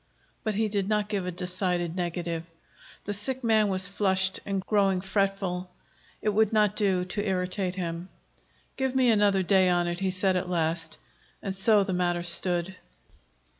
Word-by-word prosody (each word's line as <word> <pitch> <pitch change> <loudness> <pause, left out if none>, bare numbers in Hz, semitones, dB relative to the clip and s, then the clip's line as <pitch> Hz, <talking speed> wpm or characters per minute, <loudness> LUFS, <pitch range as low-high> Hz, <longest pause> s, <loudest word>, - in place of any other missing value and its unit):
But 215 -2 -1
he 220 +1 +1
did 200 -1 -1
not 210 -1 0
give 195 -4 -2
a - - -2
decided 180 -1 -2
negative. 175 -2 -2 0.6
The 205 - -2
sick 250 +6 -2
man 220 -2 +3
was 190 -1 +3
flushed 190 -2 +1
and 195 -1 -2
growing 195 -3 +2
fretful; 190 -1 -1 0.5
it - - +2
would 215 0 +2
not 210 -2 +3
do 190 -4 +1
to 205 +3 -3
irritate 185 -1 -1
him. 170 0 -4 0.7
"Give 265 -1 -1
me 255 -2 +4
another 205 -3 +3
day 190 0 +4
on 175 -1 +2
it," 175 0 -3
he 190 -1 0
said 185 0 +1
at 180 0 -2
last. 165 -1 -1 0.5
And 195 -1 -3
so 205 +1 +4
the 190 - -3
matter 175 -1 0
stood. 175 +1 0
190 Hz, 170 wpm, -27 LUFS, 180-205 Hz, 0.7 s, me